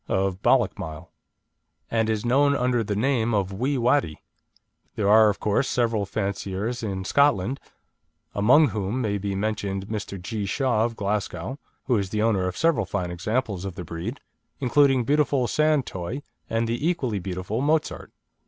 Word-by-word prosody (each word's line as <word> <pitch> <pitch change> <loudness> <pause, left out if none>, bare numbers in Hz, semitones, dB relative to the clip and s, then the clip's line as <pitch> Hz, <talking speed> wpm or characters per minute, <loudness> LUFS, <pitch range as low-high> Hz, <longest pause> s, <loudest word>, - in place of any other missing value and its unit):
of 95 0 0
Ballochmyle, 80 0 0 0.8
and 110 -1 +1
is 110 0 -1
known 140 +4 +3
under 125 -3 +1
the 105 -1 -2
name 120 -1 +1
of 100 -1 -1
Wee 130 +8 -1
Wattie. 120 - +1 0.8
There 100 - 0
are 110 +1 +7
of 100 - -2
course 105 +6 +1
several 115 -4 0
fanciers 100 +3 -3
in 95 -4 -3
Scotland, 135 -1 +2 0.7
among 130 +9 +5
whom 105 +3 -2
may 105 -4 -1
be 100 0 -3
mentioned 100 -1 -2
Mr. 105 -3 -4
G. 100 +3 -4
Shaw, 120 0 +1
of 115 -1 -3
Glasgow, 100 - -3 0.2
who 125 -3 +1
is 100 -1 -3
the 105 +1 -1
owner 100 -5 +2
of 90 - -4
several 155 - +2
fine 90 -3 -2
examples 100 +2 -2
of 95 -3 -5
the 90 - -6
breed, 85 - -5 0.4
including 135 -1 +3
beautiful 140 -1 +2
San 155 -1 +2
Toy 95 +8 -5 0.3
and 115 0 0
the 120 +7 -1
equally 130 - -1
beautiful 95 +5 -3
Mozart. 155 +2 0
110 Hz, 160 wpm, -25 LUFS, 95-130 Hz, 0.8 s, are